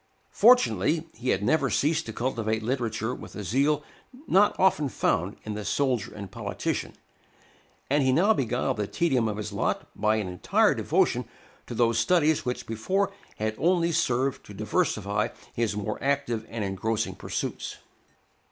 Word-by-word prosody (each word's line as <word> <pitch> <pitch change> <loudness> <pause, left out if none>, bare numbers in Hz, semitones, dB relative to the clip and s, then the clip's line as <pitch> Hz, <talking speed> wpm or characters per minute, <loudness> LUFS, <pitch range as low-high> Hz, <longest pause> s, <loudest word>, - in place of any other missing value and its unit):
Fortunately, 170 - +4
he 125 +3 -4
had 95 - +1
never 140 +4 +2
ceased 155 +3 +1
to - - -4
cultivate 110 -2 -1
literature 115 -1 -1
with - - -10
a 105 - -5
zeal 140 - +1 0.4
not 205 -4 +3
often 185 -7 +3
found 90 -4 0
in 110 - -4
the 105 0 -5
soldier 125 -3 0
and 100 -3 -8
politician, - - -3 0.9
and 145 +2 +2
he 130 -1 +3
now 190 +11 +4
beguiled 130 - -1
the 105 -1 -1
tedium 135 -8 +1
of 105 -1 -3
his 105 - -5
lot - - -1
by 105 +1 +2
an 105 -3 -1
entire 90 -1 +2
devotion - - +1 0.4
to 120 - -6
those 115 -1 +2
studies 160 +3 +3
which 125 0 -3
before 190 - 0 0.3
had 110 0 -1
only 170 -1 +2
served 130 -2 0
to - - -10
diversify 105 +2 0 0.3
his 115 -3 -1
more 105 +1 -3
active 135 -5 0
and 115 -2 -3
engrossing 105 +3 -1
pursuits. - - -4
120 Hz, 155 wpm, -27 LUFS, 110-150 Hz, 0.9 s, Fortunately